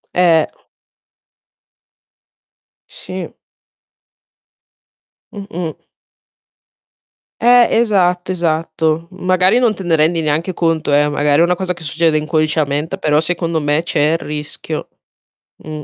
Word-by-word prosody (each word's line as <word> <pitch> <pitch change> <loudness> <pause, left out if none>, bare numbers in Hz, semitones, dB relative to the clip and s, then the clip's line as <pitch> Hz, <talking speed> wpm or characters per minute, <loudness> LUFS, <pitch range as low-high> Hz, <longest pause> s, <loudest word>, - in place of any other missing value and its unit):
Eh. 170 -3 +4 2.4
Sì. 185 -1 -7 2.0
Mh-mh. 180 -6 -7 1.6
Eh. 245 0 +6
Esatto, 185 -5 +1
esatto. 165 -1 -1
Magari, 185 +4 +2
non 235 -4 +2
te 190 - -8
ne 170 -2 +2
rendi 160 +2 +2
neanche 155 +4 -1
conto, 165 -4 0
eh. 145 +1 +3
Magari, 145 +1 +2
è - - +6
una 180 +1 +2
cosa 180 0 -2
che 170 - -13
succede 160 +1 +1
inconsciamente, 155 -1 -1
però 150 -1 +1
secondo 165 0 -1
me 145 +2 0
c'è 150 -2 +1
il - - +1
rischio. 150 0 -6 0.7
Mh. 155 -1 -8
165 Hz, 105 wpm, -17 LUFS, 155-180 Hz, 2.4 s, Eh